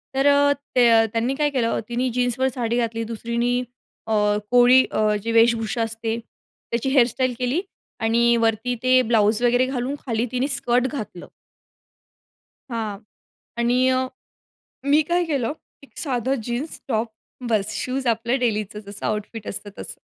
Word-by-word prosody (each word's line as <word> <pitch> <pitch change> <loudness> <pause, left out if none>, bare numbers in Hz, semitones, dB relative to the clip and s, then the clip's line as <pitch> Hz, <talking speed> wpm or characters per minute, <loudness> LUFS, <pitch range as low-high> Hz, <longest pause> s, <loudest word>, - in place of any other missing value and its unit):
तर 270 +1 +3
अ, 285 0 +5 0.2
ते 245 -2 +6
अ, 225 -1 +5
त्यांनी 235 +4 0
काय 295 +1 +1
केलं, 250 -5 0
तिनी 250 +2 0
जीन्सवर 245 +1 +1
साडी 235 -2 -1
घातली. 230 -1 -1
दुसरीनी 235 +2 -1 0.4
अ, 220 - 0 0.4
कोळी 245 +1 +7
अ, - - -1 0.2
जी 230 - -2
वेशभूषा 230 0 +3
असते. 225 0 -3 0.5
त्याची 235 +3 0
हेयरस्टाइल 255 -1 +2
केली 255 +7 0 0.4
आणि 235 +1 +3
वरती 225 +2 0
ते 255 0 +5
ब्लाउज 220 -2 +2
वगैरे 245 +1 +4
घालून, 260 +1 -2
खाली 230 -2 0
तिने 255 +2 0
स्कर्ट 250 -2 +1
घातलं. 215 -10 -7 1.4
हां. 220 -3 -3 0.6
आणि 235 +1 +2 1.1
मी 290 +2 +4
काय 350 +1 +2
केलं. 280 -6 -1 0.3
एक 280 - -19
साधं 260 -2 -1
जीन्स, 245 +7 -4
टॉप 225 -2 -1 0.4
बस. 210 -3 +1
शूज 260 0 -3
आपलं 235 +3 +1
डेलीचं 215 -4 -1
जसं 200 0 -6
आउटफिट 215 +1 -4
असतं 205 +1 -6
तसं. - - -8
240 Hz, 145 wpm, -23 LUFS, 225-255 Hz, 1.4 s, कोळी